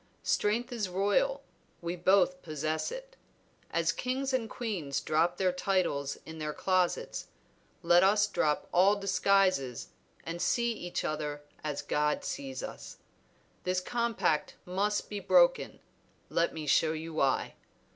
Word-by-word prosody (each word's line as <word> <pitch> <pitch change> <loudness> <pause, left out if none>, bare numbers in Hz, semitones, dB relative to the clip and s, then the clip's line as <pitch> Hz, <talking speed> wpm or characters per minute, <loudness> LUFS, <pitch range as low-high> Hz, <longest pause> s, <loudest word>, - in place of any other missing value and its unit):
Strength 235 +5 +1
is 220 -6 -2
royal, 205 - +1 0.4
we 170 +1 -3
both 180 0 +3
possess 155 - -2
it; - - -8 0.5
as 165 0 +1
kings 260 +6 -2
and 235 -4 0
queens 180 - -3
drop 165 +3 +1
their 185 -1 +2
titles 180 -7 0
in 160 0 -9
their 150 -1 -3
closets, 190 - 0 0.6
let 175 +1 +6
us 205 +2 +5
drop 150 -7 0
all 190 +4 +5
disguises 195 - +1 0.3
and 170 +1 -5
see 235 +6 +2
each 175 -5 -4
other 150 -1 -3 0.2
as 150 -2 -3
God 150 - 0
sees 275 - -5
us. - - -8 0.7
This 185 0 +1
compact 235 -7 0
must 200 +3 -1
be 205 - -4
broken; - - +3 0.5
let 170 - +1
me 155 -1 -6
show 155 +2 +3
you 160 +1 -6
why. 135 -4 +1
185 Hz, 135 wpm, -30 LUFS, 160-220 Hz, 0.7 s, let